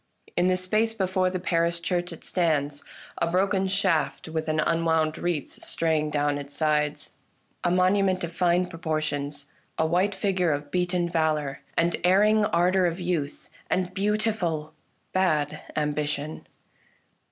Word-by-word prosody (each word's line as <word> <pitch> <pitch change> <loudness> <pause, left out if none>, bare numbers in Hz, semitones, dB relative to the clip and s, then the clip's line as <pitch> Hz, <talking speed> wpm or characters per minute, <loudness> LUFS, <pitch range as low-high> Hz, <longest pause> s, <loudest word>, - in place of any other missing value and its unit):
In 175 +1 +3
the 185 0 +3
space 215 +5 +1
before 185 -2 +1
the 185 - -2
parish 170 -1 0
church 175 +1 -2
it 165 - -10
stands 145 -5 0 0.2
— - - -19
a 170 - +1
broken 190 +2 +1
shaft, 190 -7 0
with 160 0 -3
an 155 0 +1
unwound 160 -1 +1
wreath 170 -6 -3
straying 160 -2 0
down 145 -1 0
its 145 0 -8
sides; 150 -1 0 0.5
a 175 - +2
monument 185 +1 +2
of 170 0 -5
fine 180 0 +3
proportions, 155 -4 -3 0.3
a 160 - +2
white 185 +5 +1
figure 190 -3 +1
of 145 0 -3
beaten 180 0 +1
valour 155 -4 0 0.2
and 170 0 +2
erring 210 +4 +4
ardour 180 +1 +3
of 170 +2 -3
youth 170 -5 -2 0.2
and 185 0 0
beautiful 195 -6 0 0.4
bad 155 -5 +1
ambition. 150 0 -2
170 Hz, 140 wpm, -26 LUFS, 155-185 Hz, 0.5 s, erring